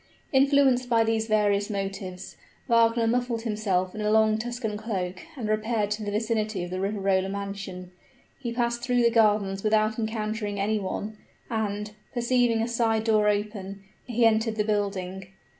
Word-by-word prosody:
Influenced 270 -2 +4
by 230 -1 +4
these 225 0 0
various 205 -1 +2
motives, 195 -2 -5 0.3
Wagner 230 -1 +4
muffled 240 0 0
himself 200 -5 -1
in 215 - -5
a 210 - +1
long 220 0 +4
Tuscan 240 -2 -3
cloak 190 -4 -4 0.2
and 230 -4 -3
repaired 215 -1 0
to 210 +1 -2
the 205 - -3
vicinity 215 -2 -1
of 175 - -6
the 185 - -3
Riverola 195 -1 0
mansion. 195 -2 -6 0.5
He 245 -4 -4
passed 235 0 -1
through 245 0 +2
the 235 - +4
gardens 205 -4 +2
without 215 +1 +2
encountering 215 -2 -2
any 210 +2 +1
one, 210 +2 -4 0.3
and, 210 -1 -2 0.2
perceiving 240 -2 +2
a - - -1
side 230 -2 +1
door 215 -2 +3
open, 205 -1 -3 0.2
he 240 -1 +2
entered 220 0 +2
the 215 - +1
building. 195 -3 -2
215 Hz, 160 wpm, -26 LUFS, 200-230 Hz, 0.5 s, Influenced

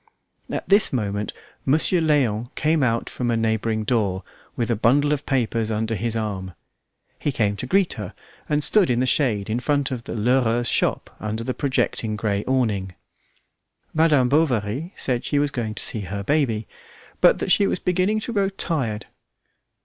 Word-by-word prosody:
At - - -4
this 200 +1 +5
moment 105 -4 -2 0.3
Monsieur 160 +5 +2
Léon 125 -8 +1
came 155 0 +1
out 115 -3 +1
from 125 -1 -3
a 115 - +1
neighbouring 110 0 0
door 105 -6 0 0.3
with 120 0 -1
a - - +2
bundle 145 +7 +3
of 145 -1 -4
papers 115 -4 0
under 110 +1 -1
his 115 +2 -2
arm. 95 -5 -4 0.6
He 145 - -1
came 105 -5 0
to 125 - -4
greet 195 +4 +2
her, 105 -5 -7 0.3
and 150 0 +1
stood 205 -2 +4
in 120 -1 +2
the 130 - +2
shade 120 -7 +1
in 110 +3 -1
front 140 +1 0
of 120 -3 -5
the - - -5
Lheureux's 120 +1 +2
shop - - 0
under 110 +1 -3
the 130 +2 -2
projecting 125 -5 -1
grey 105 -1 -1
awning. 105 -8 0 1.0
Madame 155 -5 +4
Bovary 135 - 0
said 125 -2 -1
she 145 - -1
was 145 0 +1
going 110 -5 -3
to - - -1
see 110 - 0
her 100 +1 -5
baby, 115 -5 0 0.5
but - - +6
that - - -2
she 200 - +5
was - - 0
beginning 185 +4 +1
to 235 - -4
grow 200 -2 +2
tired. 140 - -2
120 Hz, 175 wpm, -23 LUFS, 110-145 Hz, 1.0 s, but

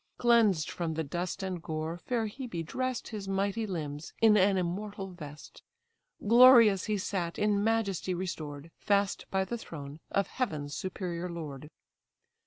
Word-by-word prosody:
Cleansed 225 - +3
from 165 -2 -3
the 160 - -1
dust 175 +6 -4
and 185 -3 -3
gore, 160 0 -3
fair 230 +4 -1
Hebe 215 -7 -5
dress'd 255 +7 -3
His 210 -3 -6
mighty 200 +3 -1
limbs 150 -4 -5
in 220 -2 +6
an 195 -1 +4
immortal 195 +2 -3
vest. 150 -4 -11 0.7
Glorious 230 -4 +8
he 215 -1 0
sat, 185 -3 -3
in 205 -1 +2
majesty 200 -5 0
restored, 160 -4 -5
Fast 200 -1 +1
by 190 0 +1
the 235 +3 -4
throne 145 -5 -8
of 200 - +1
heaven's 150 - -3
superior 180 -1 -4
lord. 150 -4 -7
190 Hz, 145 wpm, -30 LUFS, 165-210 Hz, 0.7 s, Glorious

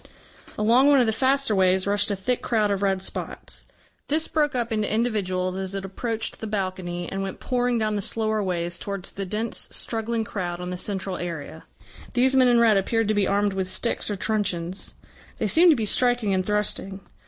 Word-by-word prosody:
Along 235 +6 +4
one 285 -2 +6
of 250 - +4
the 220 - +1
faster 270 0 +2
ways 185 0 +3
rushed 205 +1 +1
a 200 - 0
thick 240 +6 -1
crowd 215 -3 +1
of 200 -1 -1
red 190 -1 +1
spots. - - -5 0.4
This 310 +2 0
broke 295 -3 +1
up 240 -1 -1
into 215 -1 0
individuals 190 -5 0
as 190 0 -4
it 195 -1 -4
approached 225 +3 -4
the 220 - -5
balcony, 185 -4 -3
and 195 - -3
went 195 -1 -5
pouring 245 -1 0
down 215 -1 0
the 205 - -1
slower 220 +1 -1
ways 175 -2 -2
towards 200 -2 -5
the 195 -1 -5
dense 215 +4 -3
struggling 225 0 -2
crowd 180 -6 -4
on 180 0 -5
the - - -3
central 190 0 -3
area. 165 -2 -6 0.5
These 260 +2 +4
men 260 -1 +6
in 240 -1 +5
red 225 -3 +5
appeared 225 +3 +1
to - - +3
be 205 -2 +2
armed 200 0 +1
with 190 -1 -2
sticks 200 +6 0
or 205 - -1
truncheons; 190 -3 -1 0.4
they - - -1
seemed 345 +2 +6
to - - +5
be 225 -4 -1
striking 245 -2 +2
and 185 0 +1
thrusting. 205 -1 -1
205 Hz, 200 wpm, -25 LUFS, 190-230 Hz, 0.5 s, one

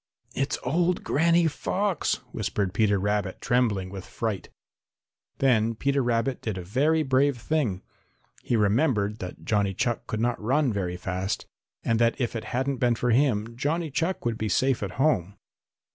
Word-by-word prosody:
"It's 135 +2 -1
old 170 +6 +1
Granny 170 +3 +3
Fox," 190 +5 0 0.2
whispered 100 -3 -2
Peter 105 -1 +3
Rabbit, 100 -1 -1
trembling 105 -7 +1
with 95 -2 -7
fright. 105 -3 -4 0.9
Then 115 -4 +2
Peter 140 +4 +1
Rabbit 120 +1 0
did 110 -4 -3
a 90 - -5
very 150 - +2
brave 135 0 +2
thing. 120 -7 -1 0.6
He 120 - 0
remembered 105 -1 +2
that 90 -1 -8
Johnny 100 -3 +1
Chuck 120 +4 -1
could 110 - -3
not 120 0 0
run 130 +3 +2
very 90 -3 -2
fast 95 +1 -3 0.4
and 115 -1 +1
that 115 +2 +2
if 120 -2 -1
it 110 -1 -4
hadn't 130 +4 -1
been 120 -1 +2
for 120 +1 0
him, 115 -3 +2
Johnny 155 +5 -1
Chuck 170 +4 -1
would 115 -1 -1
be 110 - -1
safe 130 +5 +2
at 100 -3 -3
home. 105 - +1
120 Hz, 160 wpm, -26 LUFS, 105-140 Hz, 0.9 s, Granny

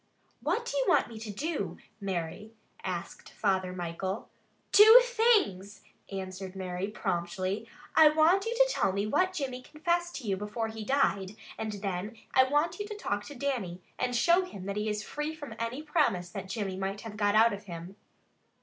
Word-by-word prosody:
"What 360 - 0
do 285 - -4
you 270 - +2
want - - +4
me 225 -2 -8
to 220 0 -7
do, 205 - -3 0.2
Mary?" 195 +3 -4 0.3
asked 180 -2 -5
Father 190 -3 0
Michael. 185 +3 -4 0.4
"Two 440 +4 +10
things," 425 - +2 0.3
answered 190 0 -6
Mary 185 0 -3
promptly. 190 +1 -2 0.3
"I 315 -1 +9
want 320 +6 +4
you 470 - -1
to - - +5
tell 195 - +1
me 200 +1 0
what 370 +12 +2
Jimmy 265 -7 -3
confissed 345 +5 -1
to 265 -5 -6
you 195 -1 +1
before 210 +3 -3
he 220 0 -6
died, 210 -6 +1 0.2
and 220 -1 -4
then 200 +2 -4 0.2
I 260 - +6
want 295 +8 +1
you 410 - -3
to 425 - -6
talk 205 - -2
to 290 - -9
Dannie 240 -10 -2 0.2
and 250 -1 0
show 340 +9 +5
him 200 - -8
that 200 0 -3
he 210 +1 -1
is 210 0 -2
free 300 +5 -4
from 290 -7 -8
any 235 +6 -3
promise 195 - +1
that 195 -1 -6
Jimmy 195 -3 -3
might 195 +1 -3
have 225 -2 -8
got 205 -1 +2
out 225 0 +6
of 200 +1 -7
him. 175 +1 -8
215 Hz, 185 wpm, -30 LUFS, 190-295 Hz, 0.4 s, Two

